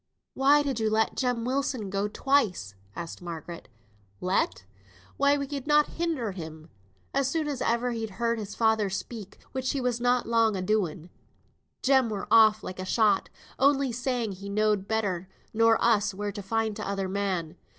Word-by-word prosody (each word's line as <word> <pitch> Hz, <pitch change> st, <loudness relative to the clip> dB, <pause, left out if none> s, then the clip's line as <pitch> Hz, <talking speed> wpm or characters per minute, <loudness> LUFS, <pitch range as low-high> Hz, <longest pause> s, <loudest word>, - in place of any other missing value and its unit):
"Why 285 Hz, +2 st, +4 dB
did 270 Hz, -5 st, -2 dB
you 220 Hz, -1 st, +1 dB
let 220 Hz, +1 st, +1 dB
Jem 245 Hz, -3 st, 0 dB
Wilson 255 Hz, -6 st, -1 dB
go 200 Hz, +1 st, 0 dB
twice?" 210 Hz, -, +1 dB, 0.2 s
asked 170 Hz, +1 st, -7 dB
Margaret. 170 Hz, 0 st, -7 dB, 0.5 s
"Let! 180 Hz, -, 0 dB, 0.5 s
why 280 Hz, +1 st, +3 dB
we 280 Hz, -, -2 dB
could 280 Hz, 0 st, -6 dB
not 300 Hz, 0 st, +4 dB
hinder 310 Hz, -11 st, -1 dB
him. 160 Hz, -3 st, -9 dB, 0.4 s
As 275 Hz, -1 st, +2 dB
soon 310 Hz, +2 st, -1 dB
as 280 Hz, -4 st, -3 dB
ever 235 Hz, +2 st, +1 dB
he'd 225 Hz, -2 st, -3 dB
heard 235 Hz, 0 st, 0 dB
his 205 Hz, -1 st, -6 dB
father 220 Hz, -3 st, +2 dB
speak 200 Hz, +1 st, -6 dB
(which 260 Hz, -1 st, -2 dB
he 280 Hz, -, -1 dB
was 245 Hz, -2 st, -1 dB
na 245 Hz, 0 st, +3 dB
long 225 Hz, -2 st, +2 dB
a 185 Hz, -, -2 dB
doing), 180 Hz, -5 st, -1 dB, 0.7 s
Jem 265 Hz, -3 st, +4 dB
were 205 Hz, -2 st, -4 dB
off 220 Hz, -1 st, +6 dB
like 185 Hz, -, -7 dB
a -, -, -3 dB
shot; 205 Hz, 0 st, +2 dB, 0.3 s
only 275 Hz, -1 st, +3 dB
saying 245 Hz, -2 st, -2 dB
he 195 Hz, +1 st, -8 dB
knowed 210 Hz, -1 st, +1 dB
better 190 Hz, -5 st, -1 dB, 0.2 s
nor 225 Hz, 0 st, +4 dB
us 210 Hz, -3 st, +3 dB
where 205 Hz, +1 st, -3 dB
to 205 Hz, +1 st, -7 dB
find 220 Hz, +2 st, -1 dB
t'other 200 Hz, -2 st, -2 dB
man. 185 Hz, -4 st, -2 dB
220 Hz, 170 wpm, -27 LUFS, 195-255 Hz, 0.7 s, off